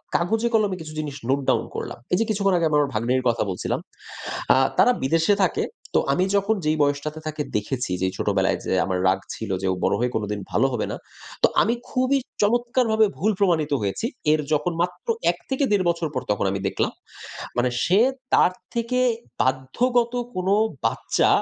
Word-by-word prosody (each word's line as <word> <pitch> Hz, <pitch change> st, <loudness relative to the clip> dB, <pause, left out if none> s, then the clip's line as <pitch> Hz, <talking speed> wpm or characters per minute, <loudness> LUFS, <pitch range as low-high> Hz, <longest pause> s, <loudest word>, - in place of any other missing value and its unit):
কাগজে 220 Hz, +7 st, +1 dB
কলমে 210 Hz, -4 st, +2 dB
কিছু 155 Hz, -1 st, -8 dB
জিনিস 150 Hz, -2 st, -4 dB
নোট 135 Hz, +1 st, +3 dB
ডাউন -, -, +3 dB
করলাম। -, -, -5 dB, 0.2 s
এই -, -, +5 dB
যে, 225 Hz, -, +2 dB
কিছুক্ষণ 195 Hz, -2 st, +1 dB
আগে, 170 Hz, -2 st, +2 dB
আমার 145 Hz, -2 st, +2 dB
ভাগ্নেরর 125 Hz, +4 st, 0 dB
কথা 115 Hz, -, +1 dB
বলছিলাম। 90 Hz, -, -2 dB, 0.8 s
আ -, -, +4 dB, 0.2 s
তারা 250 Hz, -, +6 dB
বিদেশে 165 Hz, +8 st, +3 dB
থাকে। 435 Hz, -, -1 dB, 0.3 s
তো -, -, +6 dB
আমি 180 Hz, -, +2 dB
যখন 200 Hz, +2 st, +2 dB
যেই 155 Hz, +1 st, +2 dB
বয়সটাতে 145 Hz, +2 st, 0 dB
তাকে 155 Hz, -1 st, -3 dB
দেখেছি 115 Hz, +1 st, -2 dB
যে, 95 Hz, -, +2 dB
ছোটবেলায় 95 Hz, -2 st, +1 dB
যে, -, -, -1 dB
আমার 95 Hz, -1 st, -1 dB
রাগ 95 Hz, +1 st, +3 dB, 0.2 s
ছিল 110 Hz, -, -6 dB
যে, 95 Hz, -, -1 dB
ও -, -, 0 dB
বড় -, -, +2 dB
হয়ে 125 Hz, +1 st, 0 dB
কোনদিন 105 Hz, -1 st, -2 dB
ভালো -, -, +3 dB
হবে 120 Hz, -, -1 dB
না। -, -, -3 dB, 0.5 s
তো -, -, +8 dB
আমি 225 Hz, -, +2 dB, 0.2 s
খুবই 255 Hz, +2 st, +2 dB, 0.2 s
চমৎকারভাবে 235 Hz, 0 st, +3 dB
ভুল 215 Hz, -, +2 dB
প্রমাণিত 170 Hz, -7 st, +2 dB
হয়েছি। 100 Hz, -, -2 dB, 0.3 s
এর 155 Hz, -, +3 dB
যখন 150 Hz, +4 st, +1 dB
মাত্র 180 Hz, 0 st, -3 dB, 0.2 s
১-১.৫ 260 Hz, -9 st, -1 dB
বছর 170 Hz, -1 st, 0 dB
পর, 130 Hz, -, -1 dB
তখন 100 Hz, -, 0 dB
আমি 100 Hz, -, -2 dB
দেখলাম। -, -, -1 dB, 0.7 s
মানে 125 Hz, +1 st, +2 dB
সে 185 Hz, +3 st, +4 dB, 0.4 s
তার 180 Hz, -, +5 dB, 0.2 s
থেকে 235 Hz, +2 st, 0 dB, 0.4 s
বাধ্যগত 235 Hz, -, +1 dB, 0.2 s
কোনও 185 Hz, +2 st, +1 dB, 0.3 s
বাচ্চা, -, -, +1 dB
160 Hz, 175 wpm, -23 LUFS, -, 0.8 s, তো